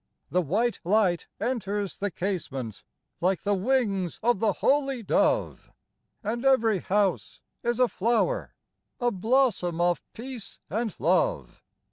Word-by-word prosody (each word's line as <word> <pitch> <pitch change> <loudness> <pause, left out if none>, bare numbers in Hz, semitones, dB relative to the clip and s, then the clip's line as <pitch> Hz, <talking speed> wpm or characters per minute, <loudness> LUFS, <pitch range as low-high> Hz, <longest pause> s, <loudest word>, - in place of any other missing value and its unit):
The 180 - +3
white 215 - 0
light 185 -2 +2
enters 205 -5 -2
the 205 - -1
casement 135 - -4 0.4
Like 185 +1 +1
the 205 - +1
wings 200 -4 0
of 240 -3 +3
the 215 -2 +2
Holy 275 -1 +1
Dove; - - +1 0.5
And 230 +4 -2
every 230 -7 +4
house 195 0 0 0.2
is 240 0 -1
a 250 - +5
flower, 235 - 0 0.4
A 245 -1 +1
blossom 220 -5 +1
of 175 0 +2
peace 240 -4 -8
and 220 +1 -1
love. - - +1
210 Hz, 125 wpm, -27 LUFS, 185-240 Hz, 0.5 s, a